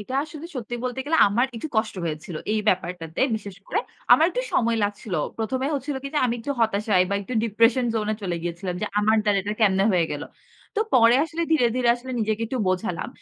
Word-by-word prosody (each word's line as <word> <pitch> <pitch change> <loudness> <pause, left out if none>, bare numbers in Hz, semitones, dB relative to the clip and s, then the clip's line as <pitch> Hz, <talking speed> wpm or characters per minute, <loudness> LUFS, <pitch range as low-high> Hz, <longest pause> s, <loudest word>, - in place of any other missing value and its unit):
এটা 255 +6 -6
আসলে 310 +1 -9
সত্যি 240 0 -5
বলতে 250 +1 -3
গেলে 325 +2 +1
আমার 235 +6 +2
একটু 270 - -5
কষ্ট 220 0 +1
হয়েছিল 155 +1 -4 0.2
এই 215 - +1
ব্যাপারটাতে 175 -3 -1 0.2
বিশেষ 200 -3 -9
করে 415 - 0 0.3
আমার 320 - +7
একটু - - -2
সময় 230 -1 +2
লাগছিল। 205 -1 -4 0.2
প্রথমে 255 +4 -1
হচ্ছিল 280 0 -3
কি 275 - -4
যে, - - +3
আমি 235 - 0
একটু 285 - -5
হতাশা 215 -1 +1 0.2
বা - - +1
একটু 250 +5 -6
ডিপ্রেশন 230 +3 +3
জোন 215 -2 -1
এ - - -1
চলে 180 -3 -2
গিয়েছিলাম 175 +2 -4
যে, - - 0
আমার 215 +1 +3
দ্বারা 205 -2 +3
এটা 210 +2 -3
কেমনে 195 -2 +4
হয়ে 170 -3 +2
গেল। 145 - -4 0.5
তো - - +2
পরে 235 0 +6
আসলে 325 +1 -3
ধীরে, 290 -7 +4
ধীরে 250 -2 +2
আসলে 255 +1 -8
নিজেকে 220 +1 -1
একটু 255 +3 -3
বোঝালাম। 180 -2 -1
220 Hz, 215 wpm, -24 LUFS, 195-255 Hz, 0.5 s, আমার